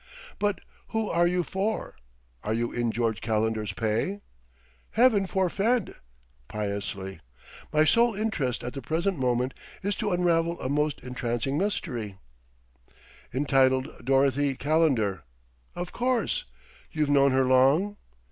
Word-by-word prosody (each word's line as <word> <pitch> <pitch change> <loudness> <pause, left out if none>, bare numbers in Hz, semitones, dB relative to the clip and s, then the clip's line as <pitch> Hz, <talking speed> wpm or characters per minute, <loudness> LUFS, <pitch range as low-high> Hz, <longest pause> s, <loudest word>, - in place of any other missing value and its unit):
"But 205 -2 0 0.3
who 220 -1 -1
are 175 0 +3
you 180 0 +1
for? 195 - -2 0.5
Are 110 - 0
you 120 +1 -1
in 120 -1 0
George 110 -4 -1
Calendar's 110 -1 0
pay?" 115 - -1 0.7
"Heaven 220 -4 +4
forfend!" 195 +5 +1 0.5
piously. 100 -3 -4 0.5
"My 155 0 +4
sole 230 +5 +4
interest 165 - -1
at 125 - -4
the 135 - -5
present 165 +6 -1
moment 125 0 +1 0.3
is 200 0 0
to 215 - -1
unravel 170 -1 +1
a 130 - -3
most 150 +1 0
entrancing 125 +1 -2
mystery 120 - -2 0.6
" 60 0 -27
"Entitled 130 -2 +2
'Dorothy 135 +1 +2
Calendar'! 135 - +1 0.5
Of 175 0 -4
course. 255 - 0 0.5
You've 155 -2 0
known 140 -1 +5
her 130 0 +4
long?" 135 +11 +4
140 Hz, 125 wpm, -27 LUFS, 120-185 Hz, 0.7 s, known